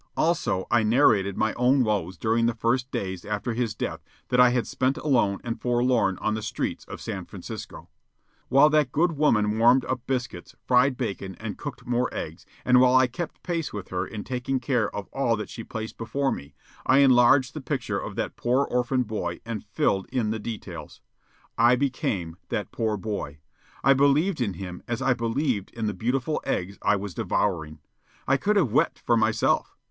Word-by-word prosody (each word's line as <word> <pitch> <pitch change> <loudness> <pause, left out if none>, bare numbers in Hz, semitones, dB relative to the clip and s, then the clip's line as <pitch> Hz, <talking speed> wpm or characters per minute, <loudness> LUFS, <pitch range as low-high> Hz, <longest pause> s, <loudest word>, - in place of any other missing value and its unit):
Also, 155 - +1
I 120 - +4
narrated 110 -4 +3
my 110 0 +1
own 125 +2 +3
woes 95 -5 -1
during 115 +3 +1
the 120 - 0
few 115 +2 +2 0.2
days 95 -2 -4
after 105 +3 -3
his 115 -2 -2
death - - -4 0.3
that 125 - +2
I 125 0 +8
had 125 -1 0
spent 130 +1 0
alone 115 -9 +1
and 115 -1 -4
forlorn 120 -5 +2
on 110 - -1
the 110 - -3
streets 105 - -3
of - - -8
San - - -4
Francisco. - - -9 0.6
While 140 +4 +6
that 150 -4 +3
good 170 +5 +2
woman 110 -8 +2
warmed 120 +3 +5
up 130 -1 -2
biscuits, 125 -9 -4
fried 125 +1 +3
bacon, 95 -6 -4
and 110 -2 -5
cooked 140 -4 -8
more 125 0 0
eggs, 80 +1 -6 0.2
and 125 0 +6
while 130 0 +5
I 130 0 +6
kept 130 +8 -6
pace 170 -4 -2
with 100 -3 -7
her 90 0 -2
in 105 -2 -6
taking 130 +1 -2
care 120 -3 0
of 100 -2 -6
all 120 -4 +1
that 105 - -6
she 115 - -7
placed 110 -1 -7
before 135 +5 -1
me, 70 0 -7 0.3
I 130 - +4
enlarged 130 -1 +5
the 155 - -6
picture 125 -8 -2
of 100 - -6
that 115 - -3
poor 125 +3 +1
orphan 125 +1 0
boy 105 -6 -4
and 115 -3 -4
filled 100 -2 0
in 120 -5 0
the 110 - -2
details. 110 0 -7 0.6
I 120 +2 +6
became 100 -11 -2
that 105 -6 -3
poor 110 -2 -1
boy. 100 -8 -4 0.5
I 135 - +6
believed 145 +5 +2
in 100 -6 -1
him 90 -1 -7
as 120 -1 -2
I 135 - +2
believed 115 -2 -1
in 115 -1 -2
the 105 - -1
beautiful 125 - -1
eggs 95 +3 -3
I - - +3
was 100 -2 -5
devouring. 80 -7 -1 0.5
I 135 - +4
could 210 +8 +1
have 175 - +2
wept 125 - +2
for 120 - +1
myself. 110 0 +1
120 Hz, 190 wpm, -26 LUFS, 105-130 Hz, 0.6 s, I